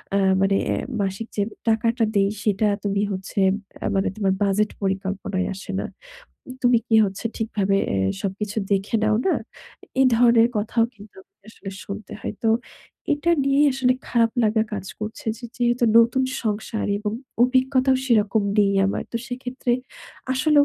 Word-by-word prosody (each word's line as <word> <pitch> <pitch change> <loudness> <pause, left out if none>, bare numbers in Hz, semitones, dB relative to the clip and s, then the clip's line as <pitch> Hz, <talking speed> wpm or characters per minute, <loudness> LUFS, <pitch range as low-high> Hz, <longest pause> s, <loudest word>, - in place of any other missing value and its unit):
আ - - +4 0.2
মানে 195 0 +3
এ্যা - - +1 0.2
মাসিক 195 +3 -3
যে - - +2 0.3
টাকাটা 225 +1 +2
দেই 195 0 +3
সেটা 210 0 +2 0.2
তুমি 200 0 0
হচ্ছে 190 +1 -4 0.4
আ - - -2
মানে 195 - +1
তোমার 195 -2 +1
বাজেট 205 +2 +2
পরিকল্পনায় 195 0 -2
আসে 195 +1 -7
না। - - -4 0.8
তুমি 245 -1 +5
কি 225 - +2
হচ্ছে 195 +3 -5
ঠিকভাবে 200 -3 0 0.2
এ - - 0 0.3
সবকিছু 200 +2 -3 0.2
দেখে 195 +3 -1
নাও 215 0 +3
না? 380 - +3 0.7
এই 265 - +6
ধরনের 235 0 +5
কথাও 225 +2 +1
কিন্তু 205 -1 -15
আমাকে 195 - -46
আসলে 195 -3 -9
শুনতে 205 +1 -7
হয়। - - -4
তো 225 - +4 0.6
এটা 295 +4 +1
নিয়েই 275 +2 +4
আসলে 255 -1 +2
খারাপ 230 -2 +3
লাগা 220 0 +3
কাজ 200 -2 -4
করছে 215 +1 -6
যে 245 - -11
যেহেতু 240 0 +1
নতুন 235 +3 +4 0.2
সংসার 215 0 -2
এবং 210 0 -3 0.3
অভিজ্ঞতাও 260 +1 +3
সেরকম 215 -3 +3 0.2
নেই 200 -1 +4
আমার। 195 - -1
তো - - -1
সেক্ষেত্রে 250 0 -3 0.6
আসলেও 290 +2 +4
215 Hz, 155 wpm, -23 LUFS, 200-245 Hz, 0.8 s, এই